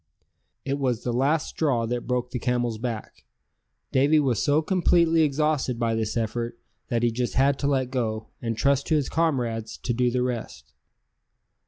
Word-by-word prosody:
It 140 +1 -1
was 125 -4 0
the 120 - -1
last 140 +6 +1
straw 130 -7 0
that 120 +1 -3
broke 125 0 -1
the 125 - -3
camel's 120 -2 -1
back; 115 -2 -5 0.7
Davy 145 +4 +4
was 125 -8 +1
so 145 +2 +2
completely 170 -2 +3
exhausted 150 -4 +1
by 115 -1 0
this 110 0 -1
effort 115 +1 -2 0.3
that 120 0 -1
he 120 - +3
just 120 +1 -2
had 135 +1 +3
to 140 - 0
let 130 -3 0
go, 110 -4 -2
and 115 -2 -2
trust 140 +2 +2
to 160 - +2
his 145 -3 0
comrades 120 -9 -1
to 120 - -2
do 125 +1 +2
the 125 +1 0
rest. 110 - -5
125 Hz, 175 wpm, -25 LUFS, 115-140 Hz, 0.7 s, Davy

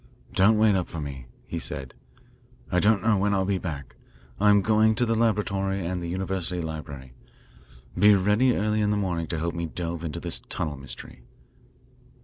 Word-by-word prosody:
Don't 105 +4 +4
wait 110 -1 +4
up 90 -2 0
for 85 - -7
me," 70 -4 -6 0.2
he - - -4
said. 65 -1 -4 0.8
"I 90 - +3
don't 105 0 +3
know 110 -2 +3
when 100 +1 +1
I'll 95 -1 +1
be 95 -1 0
back. 70 -8 -6 0.4
I'm 105 -1 +5
going 110 +1 +4
to 120 - +2
the 115 - +1
laboratory 100 -4 0
and 90 +1 -2
the 85 - -4
university 90 -1 -2
library. 75 -5 -6 0.8
Be 105 +3 +6
ready 105 +6 +3
early 105 +1 +1
in 105 - +2
the 105 - +1
morning 90 -5 -1
to 80 - -3
help 85 +2 -2
me 85 0 -3
delve 85 0 -5
into 80 -3 -4
this - - -1
tunnel 75 -3 -2
mystery." 65 -2 -10
95 Hz, 180 wpm, -26 LUFS, 80-105 Hz, 0.8 s, Be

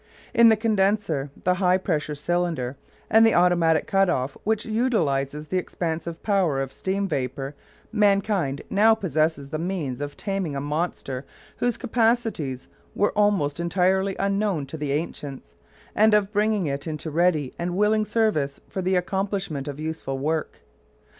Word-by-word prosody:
In 230 -1 +7
the 220 - +6
condenser, 200 -9 +1
the 180 - +3
high 180 0 +4
pressure 155 -5 -2
cylinder 160 -4 -1 0.3
and 220 +1 +6
the 225 - +5
automatic 175 -2 +3
cut 195 -1 +2
off, 130 -4 -1
which 220 0 0
utilises 150 - 0
the 185 +4 0
expansive 165 -1 -4
power 185 -9 +2
of 135 0 -3
steam 195 +1 -2
vapour, 135 -2 -3 0.4
mankind 200 -9 +1
now 220 +3 +5
possesses 155 -7 0
the 155 +1 -3
means 165 -8 -3
of 145 0 -5
taming 195 -7 -2
a - - -1
monster 145 -3 -3 0.3
whose 245 -2 0
capacities 225 - 0 0.3
were 205 - +2
almost 195 -8 +2
entirely 190 +3 +1
unknown 195 -5 0
to 140 - -8
the 150 -2 -3
ancients, 140 - -4 0.4
and 215 0 +5
of 210 0 +1
bringing 210 -2 +2
it 140 +1 -3
into 155 0 -4
ready 155 -4 +1
and 175 +1 -2
willing 215 +1 +3
service 210 -12 0
for 190 - -4
the 185 +1 +1
accomplishment 190 -5 -2
of 145 0 -5
useful 155 -4 -4
work. 155 +3 -2
175 Hz, 150 wpm, -24 LUFS, 145-205 Hz, 0.4 s, In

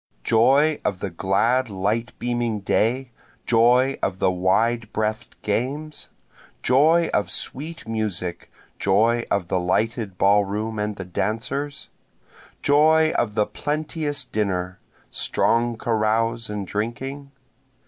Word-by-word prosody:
Joy 140 +7 +3
of 95 - -1
the 100 -1 -4
glad 115 +8 +1
light 105 +4 -2
beaming 120 -3 -1
day, 120 +6 0 0.3
joy 125 +3 +4
of 95 -1 -1
the 95 - +2
wide 110 +5 +1
breath'd 110 0 -3
games? 140 +8 -3 0.5
Joy 160 +6 +4
of 105 - +1
sweet 155 +1 -5
music, 105 -6 -3 0.3
joy 115 +5 +2
of 100 -4 0
the 90 - 0
lighted 105 +2 -1
ball 100 +2 +4
room 105 +2 -3
and 105 0 -2
the 95 - -7
dancers? 115 +10 -3 0.7
Joy 155 +2 +4
of 105 -3 -1
the 105 - +3
plenteous 150 0 -2
dinner, 95 -6 -2 0.3
strong 115 0 +1
carouse 115 0 0
and 105 -2 -4
drinking? 130 +8 -4
115 Hz, 115 wpm, -23 LUFS, 100-130 Hz, 0.7 s, joy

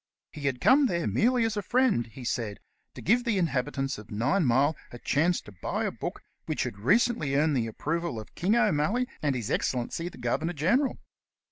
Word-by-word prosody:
He 145 -2 -4
had 130 -2 -1
come 275 - +5
there 170 -6 -1
merely 230 - +2
as 225 -1 -1
a 205 - -1
friend, 230 - +2
he 120 +3 -11
said, 115 -4 -2 0.4
to - - -9
give 235 +7 +3
the 230 -5 0
Inhabitants 135 - -1
of 105 - -12
Ninemile 135 - +2 0.2
a 120 - -8
chance 160 +8 +1
to - - -13
buy 95 - -3
a - - -1
book - - -6 0.2
which - - -1
had 100 - -5
recently 170 - +2
earned 150 +1 +3
the 115 -3 0
approval 160 +3 -3
of 110 - -11
King 195 +6 +1
O'Malley 215 +2 +2
and 145 -3 +1
His 120 -4 -3
Excellency 130 +7 -1
the - - -14
Governor 140 +8 -1
General. 205 - +1
150 Hz, 195 wpm, -28 LUFS, 125-205 Hz, 0.4 s, come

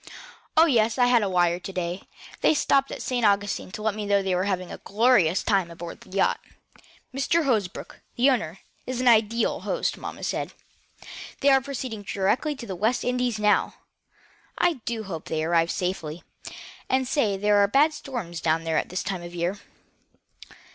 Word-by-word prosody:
"Oh, 320 - +8
yes. 230 -7 +2
I 245 - +5
had 245 -1 +4
a 205 - 0
wire 175 -1 +2
to 195 - -7
day. 180 0 -3 0.4
They - - +4
stopped 275 -1 +2
at - - -6
St. 245 -2 -1
Augustine 205 -2 +1
to 210 - -6
let 220 -1 +1
me 210 0 -5
know 200 -1 +2
they 190 -1 0
were 180 +1 0
having 185 -3 -2
a - - -8
glorious 205 -5 +3
time 195 -5 +1
aboard 170 0 -9
the - - -16
yacht. 195 +1 +1 0.7
Mr. 300 +5 +1
Hosbrook, 210 -8 -2 0.2
the 245 +3 +3
owner, 185 -9 -2 0.3
is 255 -1 -3
an 255 - 0
ideal 225 0 +3
host, - - -2
mamma - - -7
said. - - -3 0.9
They 280 - +5
are 270 0 +5
proceeding 260 -5 -5
directly 205 +10 0
to 250 - -8
the 190 - -5
West 220 +7 0
Indies, 250 -2 0
now. 210 -1 +2 0.8
I 340 -8 +1
do 225 0 -3
hope 170 -6 -6
they 155 -1 -2
will 165 - -2
arrive 165 0 +3
safely. 175 -4 -3 0.7
They 260 0 +2
say 250 -6 0
there 205 +1 +3
are 200 0 +5
bad 285 +8 +3
storms 215 - -6
down 160 0 +1
there 160 -2 +1
at - - -5
this 185 - -3
time 190 -2 -3
of 175 0 -9
year." 175 +4 -2
205 Hz, 190 wpm, -25 LUFS, 180-250 Hz, 0.9 s, Oh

